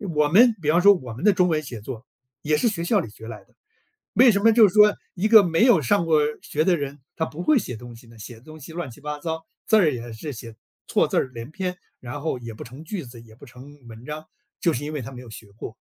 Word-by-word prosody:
我 150 0 +3
们 225 +10 +6
比 150 - -1
方 170 +3 +4
说 200 +1 +8
我 130 - -7
们 125 +10 -9
的 210 - +6
中 180 0 +2
文 155 -2 0
写 120 -6 -8
作， 120 +1 -8 0.4
也 150 0 +1
是 235 - +1
学 180 -6 -2
校 205 +4 +2
里 115 - -5
学 110 +1 -13
来 110 -2 -9
的， - - -34 0.6
为 250 -1 +6
什 200 - +1
么 225 +2 +5
就 220 -2 +6
是 180 - -8
说 210 0 +6 0.2
一 195 +4 0
个 220 -2 +8
没 170 +3 +2
有 240 -10 +5
上 170 +7 +1
过 160 -2 +3 0.2
学 155 - -1
的 180 -1 +3
人， 145 -1 -6 0.2
他 160 - 0
不 160 +3 -7
会 300 +2 +3
写 125 - -5
东 120 +1 -11
西 120 - -17
呢， 115 -1 -17
写 110 +3 -9
的 115 - -17
东 155 +1 -13
西 160 - -11
乱 170 -5 -5
七 120 - -15
八 150 0 -5
糟， 160 +1 -5 0.2
字 220 - +4
儿 180 -8 +4
也 120 -3 -7
是 145 +6 -7
写 115 0 -10 0.3
错 - - +1
字 - - -3
儿 130 - 0
连 115 +3 -8
篇， 180 +1 -4 0.2
然 125 +3 -7
后 150 -4 -3
也 115 -1 -8
不 110 - -11
成 130 +6 -12
句 190 +1 -5
子， 120 -2 -12
也 110 -1 -17
不 140 - -15
成 130 +4 -14
文 115 +1 -12
章， 150 +2 -7 0.3
就 170 - +2
是 140 +4 -4
因 150 - -5
为 150 - -4
他 125 +1 -8
没 125 -1 -10
有 115 - -13
学 110 - -11
过。 110 +1 -10
150 Hz, 305 characters per minute, -23 LUFS, 120-180 Hz, 0.6 s, 说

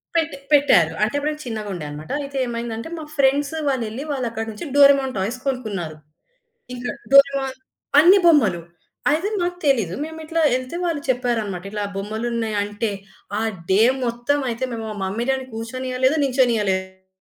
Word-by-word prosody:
పెట్టి 325 -3 0
పెట్టారు. 195 - +5
అంటే 215 +2 +2
అప్పుడు 290 +1 0
నేను 300 - -7
చిన్నగుండె 210 -8 -4
అన్నమాట. 150 +6 -8
అయితే 275 -1 -6
ఏమైందంటే 235 +2 -4
మా 315 - -6
ఫ్రెండ్స్ 280 +2 +2
వాళ్ళెళ్ళి 250 -1 -2
వాళ్ళక్కడి 230 -5 -3
నుంచి 210 +10 -7
డోరేమోన్ 275 -2 +6
టాయ్స్ 210 +7 -2
కొనుక్కున్నారు. 205 - -3 0.8
ఇంకా 245 0 -4 0.2
డోరేమోన్ 275 -1 +5 0.4
అన్ని 360 +6 +7
బొమ్మలు 220 - +4 0.5
అయితే 325 +6 +1
మాకు 355 0 -1
తెలీదు. 225 -11 +2
మేమిట్ల 320 +1 -6 0.2
ఎళ్తే 255 +6 -4
వాళ్ళు 325 -4 -1
చెప్పారన్నమాట. 225 -7 -1
ఇట్లా 210 0 -3
బొమ్మలున్నాయంటే 215 0 -2 0.5
ఆ - - -1 0.3
డే 190 +3 +4 0.2
మొత్తం 240 +5 0
అయితే 235 +2 -4
మేము 225 -1 -4
మా 215 - -5
మమ్మీ 205 +5 -2
డ్యాడీ 265 -1 0
కూర్చొనియలేదు. 255 +4 -1
నించొనియలేదు. 190 -7 0
240 Hz, 140 wpm, -22 LUFS, 210-275 Hz, 0.8 s, అన్ని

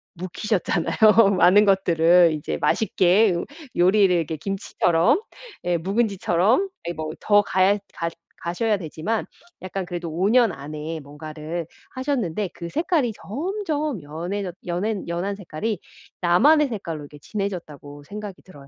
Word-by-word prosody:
묵히셨잖아요. 200 +3 +2
많은 195 +4 +6
것들을 175 -3 +4
이제 150 -1 -3
맛있게 195 +4 +3
요 170 - -2 0.3
요리를 190 +1 +5
이렇게 165 -2 0
김치처럼 175 - +1 0.4
예 175 -1 +1
묵은지처럼 200 - +1 0.2
네 170 - -2
뭐 155 -1 -5
더 205 -1 +5
가야 195 0 +2 0.2
갓 165 0 -3 0.3
가셔야 210 +6 0
되지만 170 +5 -3 0.4
약간 185 0 -4
그래도 175 -2 -5
5 175 +5 0
년 235 -2 +4
안에 150 +2 -6
뭔가를 155 +3 -6 0.3
하셨는데 235 - -2
그 170 - -7
색깔이 300 - 0
점점 305 - -3
연해졌 175 +6 -4
연해 190 +4 -2
연한 175 +4 -2
색깔이 200 +2 -4 0.4
나만의 280 - +5
색깔로 185 - -5
이렇게 145 +1 -12
진해졌다고 155 -9 -6
생각이 205 +4 -8
들어요. 145 -7 -15
185 Hz, 310 characters per minute, -23 LUFS, 165-210 Hz, 0.4 s, 많은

